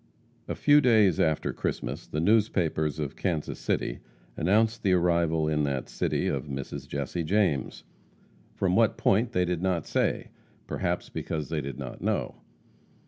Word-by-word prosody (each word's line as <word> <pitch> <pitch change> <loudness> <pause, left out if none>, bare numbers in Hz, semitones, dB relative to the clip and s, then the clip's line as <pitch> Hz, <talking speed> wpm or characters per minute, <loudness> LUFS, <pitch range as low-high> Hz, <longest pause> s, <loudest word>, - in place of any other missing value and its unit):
A - - -3
few 145 0 +5
days 110 - +4
after 80 -2 +1
Christmas, - - -4
the 75 - -3
newspapers 85 -6 +2
of 75 -1 -4
Kansas 80 -6 -2
City - - -1 0.4
announced 110 +6 +2
the 95 -4 +2
arrival 85 -3 +2
in 75 -1 +1
that 70 -2 -2
city - - -1
of - - -2
Mrs. 70 0 -6
Jesse 70 +5 -3
James, 90 -6 0 0.7
from 95 -1 +1
what 115 -1 +3
point 115 +5 +2
they 90 -7 +1
did 90 -1 -2
not 90 -4 0
say, - - 0 0.4
perhaps 90 -1 -2
because 75 -2 -4
they 80 -2 -1
did 70 -2 -6
not - - -7
know. - - -1
85 Hz, 150 wpm, -27 LUFS, 75-100 Hz, 0.7 s, few